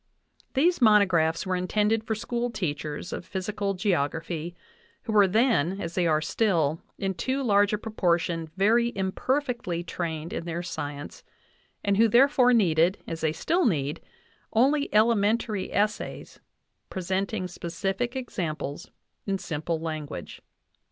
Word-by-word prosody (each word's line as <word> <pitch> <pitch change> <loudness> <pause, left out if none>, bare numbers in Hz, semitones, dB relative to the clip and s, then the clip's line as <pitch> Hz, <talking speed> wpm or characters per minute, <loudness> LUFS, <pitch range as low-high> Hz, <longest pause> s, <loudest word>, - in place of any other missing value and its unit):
These 335 +4 +3
monographs 190 -7 +4
were 185 -1 0
intended 210 +4 +1
for 220 0 -2
school 235 +2 -2
teachers 155 -5 -4
of - - -7
physi 190 +2 -3
cal 200 -1 -1
geography, 170 -2 -1 0.5
who 220 - -3
were 205 -2 +6
then, 195 - +2
as 170 -3 -4
they 175 -1 +1
are 155 -1 +2
still, 165 -4 +1 0.2
in 195 -1 -1
too 260 +10 -2
large 205 -3 +4
a 210 - +1
proportion 175 -6 -1
very 235 +4 +3
imperfectly 220 -1 -1
trained 165 -2 -4
in 165 - -4
their 170 +1 -3
science, 145 -4 -6 0.6
and 200 -1 +1
who 230 +2 +6
therefore 250 +2 +5
needed, 180 -5 +3
as 165 0 -5
they 155 - +2
still 345 - 0
need, 145 -7 -1 0.5
only 280 +6 +3
elementary 215 -1 +2
essays 210 +1 -2 0.5
presenting 190 +1 -2
specific 195 +8 -3
examples 165 - -4 0.4
in 195 -1 0
simple 160 -1 -3
language. 155 - -6
190 Hz, 130 wpm, -27 LUFS, 165-220 Hz, 0.6 s, were